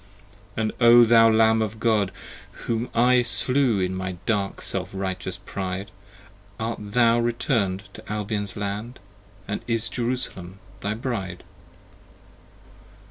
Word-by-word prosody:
And 110 -1 0
O 120 0 +8
thou 115 0 +6
Lamb 110 0 +4
of 110 0 -3
God, 110 -4 +2 0.5
whom 115 +1 -1
I 125 +1 +4
Slew 120 0 +2
in 90 0 -1
my 95 0 -3
dark 100 -4 -1
self - - -1
righteous 95 -1 -4
pride, 95 0 -5 0.7
Art 115 +1 -3
thou 115 +3 +3
return'd 115 -5 0
to - - -10
Albion's 105 -1 -3
Land? 105 +5 -4 0.5
85 - - -17
And 100 - -3
is 115 -1 0
Jerusalem 115 -7 -4 0.2
thy 100 +2 -2
Bride? 110 -7 -4
110 Hz, 125 wpm, -24 LUFS, 100-115 Hz, 0.7 s, O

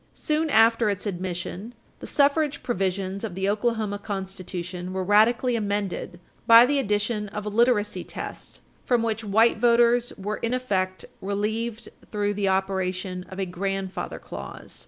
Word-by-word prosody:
Soon 310 +1 0
after 225 -2 +4
its 200 0 -2
admission, 185 +3 -4 0.2
the - - -7
suffrage 290 0 +2
provisions 195 -3 -2
of 175 - -4
the 190 +1 -1
Oklahoma 215 -1 0
Constitution 185 -3 -5
were 190 0 -1
radically 230 +5 +4
amended 200 -4 -2 0.3
by 230 +1 +9
the 285 +2 +1
addition 210 -2 0
of 210 +1 -6
a - - -1
literacy 210 -4 +2
test - - -8 0.2
from 240 -2 +2
which 225 -1 -1
white 220 +2 +3
voters 240 +1 +4
were 210 +2 -3
in 230 +2 -1
effect 190 -7 -1 0.2
relieved 215 +3 -2 0.2
through 205 -1 -1
the 200 -1 -1
operation 190 -1 -1
of 190 - -9
a 195 - 0
"grandfather 195 +1 -3
clause." - - -9
205 Hz, 145 wpm, -25 LUFS, 190-230 Hz, 0.3 s, by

